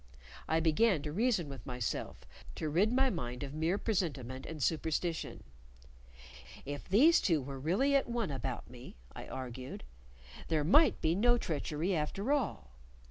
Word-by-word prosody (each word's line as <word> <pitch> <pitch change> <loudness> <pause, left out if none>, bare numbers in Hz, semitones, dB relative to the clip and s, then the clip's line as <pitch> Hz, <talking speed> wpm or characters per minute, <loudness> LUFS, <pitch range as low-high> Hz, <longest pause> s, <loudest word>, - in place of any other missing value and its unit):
I 160 - +2
began 165 +1 +3
to 150 - -4
reason 205 -2 +1
with 135 -2 -8
myself, 125 -4 -4 0.3
to 155 - -3
rid 190 +9 +3
my 260 +1 +3
mind 125 -6 -4
of 140 0 -6
mere 160 +5 0
presentiment 140 - -2
and 160 - -6
superstition. 160 +1 -1 1.2
If 145 +1 -6
these 295 - +6
two 160 -7 +2
really 155 - 0
were 280 - +6
at 270 - -7
one 235 -8 -1
about 130 -1 -4
me 125 +1 -12 0.2
(I - - -8
argued) 130 0 -7 0.6
there 155 -2 +1
might 295 - +5
be 160 - +2
no 240 +6 +4
treachery 160 -1 -2
after 195 - -2
all. 245 - -1
160 Hz, 150 wpm, -33 LUFS, 140-210 Hz, 1.2 s, these